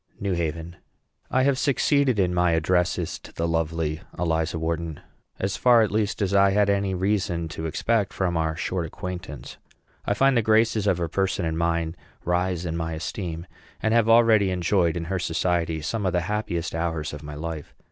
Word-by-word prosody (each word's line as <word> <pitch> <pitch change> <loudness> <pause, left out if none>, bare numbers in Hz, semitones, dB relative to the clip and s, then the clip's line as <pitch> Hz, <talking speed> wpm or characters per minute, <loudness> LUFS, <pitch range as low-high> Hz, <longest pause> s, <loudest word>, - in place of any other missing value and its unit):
NEW 100 -2 -1
HAVEN. 85 0 -3 0.5
I 130 - +2
have 135 -1 +2
succeeded 140 -3 +2
in 90 -2 +2
my 90 -1 +2
addresses 90 0 0
to - - -13
the 85 - -2
lovely 80 -1 -1 0.2
Eliza 80 -1 0
Wharton 80 -1 -3 0.4
as 95 0 -2
far, 120 -2 +5
at 110 - -1
least, 105 0 0
as 100 0 -1
I 100 0 +5
had 100 0 +3
any 100 -1 0
reason 90 -3 0
to 80 +1 -4
expect 105 +5 0
from 90 -3 -1
our 80 -1 0
short 85 0 -2
acquaintance. 90 +2 -7 0.5
I 100 - 0
find 135 +3 +4
the 120 - +4
graces 110 -1 +2
of 95 -3 +3
her 85 -1 -1
person 95 +1 -1
and 80 0 -1
mind 85 0 0 0.3
rise 90 0 0
in 85 -1 -2
my 80 -1 -2
esteem, 85 +1 -5 0.3
and 110 0 +1
have 115 -1 +3
already 115 -4 +5
enjoyed 90 -2 +1
in 85 - -3
her 95 +2 -2
society 85 -2 0
some 105 +4 -1
of 90 - 0
the 90 - +2
happiest 85 -3 -2
hours 80 -2 -2
of 75 - -7
my 75 -1 -8
life. 80 -1 -6
90 Hz, 190 wpm, -25 LUFS, 80-100 Hz, 0.5 s, far